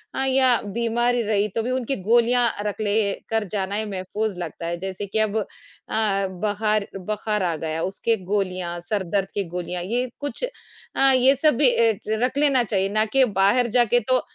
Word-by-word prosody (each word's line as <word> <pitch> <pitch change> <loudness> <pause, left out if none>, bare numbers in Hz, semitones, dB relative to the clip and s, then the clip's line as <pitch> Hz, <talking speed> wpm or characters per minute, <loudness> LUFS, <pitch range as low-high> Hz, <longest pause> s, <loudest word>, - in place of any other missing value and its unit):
अ, - - -2
या 260 -2 +3
बीमार 235 +1 +1
ही 240 - +1
रही, 210 -1 +1
तो 220 +2 -2
भी 250 - -2
उनकी 260 +1 -1
गोलियाँ 240 +2 +4 0.2
रख 210 +1 -3
लें 205 -1 0
कर 225 -1 +1
जाना 200 -1 -2
ही 215 +1 -1
महफ़ूज़ 195 +1 -3
लगता 165 0 -6
है, 170 0 -2
जैसे 190 +1 -5
कि 205 +3 -2
अब 215 0 +1
अ, 215 - 0 0.5
बहार 210 0 0
बुखार 210 +1 -2
आ 170 -2 0
गया, 160 +1 -3
उसके 225 +4 0 0.2
गोलियाँ, 185 -4 -1
सर 205 -3 0
दर्द 195 -1 +1
की 200 - -1
गोलियाँ, 180 0 -3
ये 245 +6 -1
कुछ 285 - -5 0.5
अ, 270 0 +5
ये 260 +2 +5
सब 300 -1 +3
भी 285 - +5 0.2
एट 220 -3 +1 0.2
रख 255 +2 0
लेना 275 -4 +3
चाहिए, 195 -2 0
ना 215 +1 +1
कि 265 +4 +3
बाहर 235 +5 +4
जाके 240 0 +4
तो 255 - +4
215 Hz, 190 wpm, -23 LUFS, 195-240 Hz, 0.5 s, अ